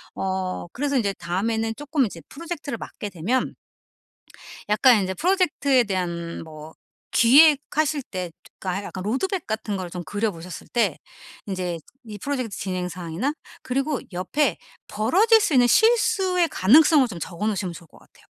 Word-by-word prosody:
어 190 -2 -3
그래서 280 +1 -1
이제 205 -5 +1
다음에는 220 +7 -1
쪼끔 290 -1 0
이제 170 -5 -7
프로젝트를 305 -4 -6
맡게 205 - -7
되면 200 +9 -1 1.2
약간 220 +2 +5
인제 190 0 -2
프로젝트에 300 - +2
대한 170 -5 -3
뭐 155 0 -11 0.4
기획하실 295 +3 +4
때 185 -6 -5
좀 185 - -6
하 195 +3 -3
약간 190 - -7
로드맵 330 - -2
같은 220 -1 -3
거를 185 -2 -5
좀 175 0 -6
그려보셨을 185 -3 -4
때 210 -10 0 0.5
인제 180 -3 -3 0.3
이 210 -2 -8
프로젝트 255 -4 -3
진행 185 -2 -3
사항이나 180 - -3 0.3
그리고 275 +1 -1
옆에 200 - 0 0.3
벌어질 395 - +4
수 385 -6 +1
있는 245 - +6
실수의 385 - +3
가능성을 290 - +5
좀 195 -7 -8
적어 175 +5 -4
놓으시면 190 -4 -2
좋을 170 -1 -12
것 - - -20
같아요. - - -23
220 Hz, 335 characters per minute, -24 LUFS, 185-285 Hz, 1.2 s, 있는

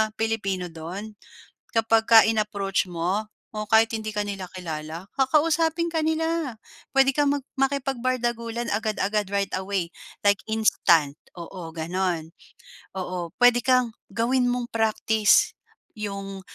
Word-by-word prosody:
Pilipino 195 -6 -2
do'n 175 +7 -7 0.6
kapagka 225 0 +6
in-approach 205 -4 0
mo 180 +5 -2 0.2
o 215 -1 -4
kahit 225 +1 +4
hindi 215 -1 -4
ka 210 - +1
nila, 200 -2 -5
kilala 165 +1 -6
kakausapin 320 +4 +2
ka 325 - 0
nila. 320 -4 -1 0.4
Puwede 270 0 +5
kang 285 +1 +2 0.3
makipagbardagulan 240 -4 -1
agad-agad 210 -1 0
right 200 -1 0
away 190 -2 -2 0.3
like 200 -1 +4
instant, 170 -9 +3 0.2
oo, 170 -1 -8
gano'n. 170 0 -2 0.6
Oo, 180 -3 -4
puwede 245 0 +5
kang 255 -1 +2 0.2
gawin 245 +2 +2
mong 245 -1 -1
praktis 220 -1 +3 0.5
'yong, 195 -2 -5
215 Hz, 110 wpm, -25 LUFS, 190-245 Hz, 0.6 s, kapagka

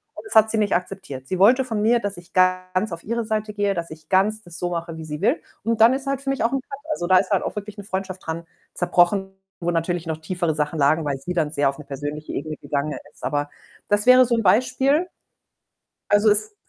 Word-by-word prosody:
und - - -10
das 415 - -5
hat 220 0 +6
sie 225 - 0
nicht 210 -3 +2
akzeptiert. 180 -7 -5
Sie 185 +3 -2
wollte 250 +7 +6
von 220 -4 -2
mir, 235 +2 +4
dass 200 -3 -3
ich 175 +1 -14
ganz 185 +2 +1
auf 170 0 -6
ihre 235 +2 -1
Seite 215 -1 -2
gehe, 205 -1 0
dass 170 -3 -5
ich 155 0 -12
ganz 210 +3 +2
das 175 -1 -9
so 175 0 -2
mache, 165 -1 -4
wie 160 - -7
sie 150 +2 -6
will 250 +10 +2 0.2
und 230 +1 0
dann 230 +3 +7
ist 270 +1 -3
halt 275 0 -1
für 275 - -4
mich 270 - -1
auch 230 - +2
'n 270 - 0
Cut, 275 +1 -9
also, 175 -12 -2
da 185 0 +6
ist 190 +2 +1
halt 195 - +2
auch - - -4
wirklich 210 0 -7
'ne 205 - -7
Freundschaft 190 -1 -5
dran 165 +1 -4 0.3
zerbrochen, 190 +2 +2 0.3
wo 175 0 0
natürlich 170 +1 -1
noch 160 -1 -2
tiefere 170 0 -1
Sachen 150 +1 -1
lagen, 155 +3 +3
weil 140 -2 -1
sie 175 +6 -4
dann 160 -4 0
sehr 145 -2 +2
auf 135 - -6
'ne 150 - -10
persönliche 145 +2 -6
Ebene 155 +2 -4
gegangen 150 +1 -3 0.2
ist. - - -21
Aber 145 +1 -1 0.4
das 205 0 +3
wäre 255 0 +8
so 235 -1 +1
'n 225 - 0
Beispiel. 255 - +3 1.0
Also 205 +1 +4
es 210 +1 +2
185 Hz, 250 wpm, -23 LUFS, 165-220 Hz, 1.0 s, wäre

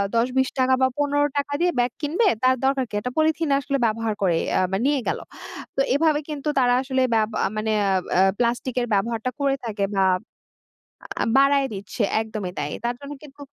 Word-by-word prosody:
৳১০,৳২০ 255 +3 +2
টাকা 260 0 +3
বা 260 - +5
৳১৫ 290 0 +2
টাকা 285 0 -1
দিয়ে 355 0 +3
ব্যাগ 245 +1 +2
কিনবে 340 +9 +1 0.2
তার 260 0 +5
দরকার 270 -1 +2
কী? - - -23
একটা 250 +4 -4
পলিথিন 315 0 +1
আসলে 280 0 -1
ব্যবহার 225 0 0
করি 175 -4 +2 0.2
আ - - +3 0.2
নিয়ে 285 -1 +2
গেল। - - -1 0.6
তো 275 - +2
এভাবে 305 0 +3
কিন্তু 295 -1 -5
তারা 245 -1 +3
আসলে 260 -1 -1
বেব 215 0 +2 0.3
মানে 215 0 -1
অ্যা 195 - +1 0.2
অ্যা 185 - +5 0.2
প্লাস্টিক 240 +1 -1
এর 240 - -2
ব্যবহারটা 230 +4 0
করে 275 -1 +1
থাকে 205 -3 -1
বা 190 -1 +3 1.2
আ - - +2
বাড়ায় 275 0 +4
দিচ্ছে 200 +3 -4 0.2
একদমই 215 -5 -5
তাই। 145 0 -3
তার 240 0 0
জন্য 280 +1 -7
কিন্তু 285 0 -14
260 Hz, 185 wpm, -23 LUFS, 220-285 Hz, 1.2 s, বা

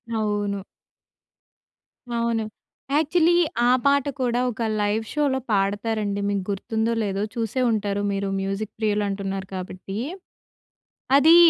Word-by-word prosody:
అవును. 205 -2 0 1.6
అవును. 230 -1 +1 0.5
యాక్చులీ 320 +3 +4 0.4
ఆ - - +6
పాట 280 -1 +4
కూడా 245 -1 +1
ఒక 235 -1 -5 0.2
లైవ్ 210 +2 +1
షోలో 285 -3 +2
పాడతారండి. 205 +1 0
మీకు 200 -2 0
గుర్తుందో, 220 +3 0
లేదో 200 0 -1
చూసే 230 +2 -1
ఉంటారు 205 -2 0
మీరు 200 0 -1
మ్యూజిక్ 195 +2 -2
ప్రియులు 210 -1 +1
అంటున్నారు 195 -1 -3
కాబట్టి. 185 +1 -6 1.2
అది 320 +4 +7
210 Hz, 110 wpm, -24 LUFS, 200-235 Hz, 1.6 s, అది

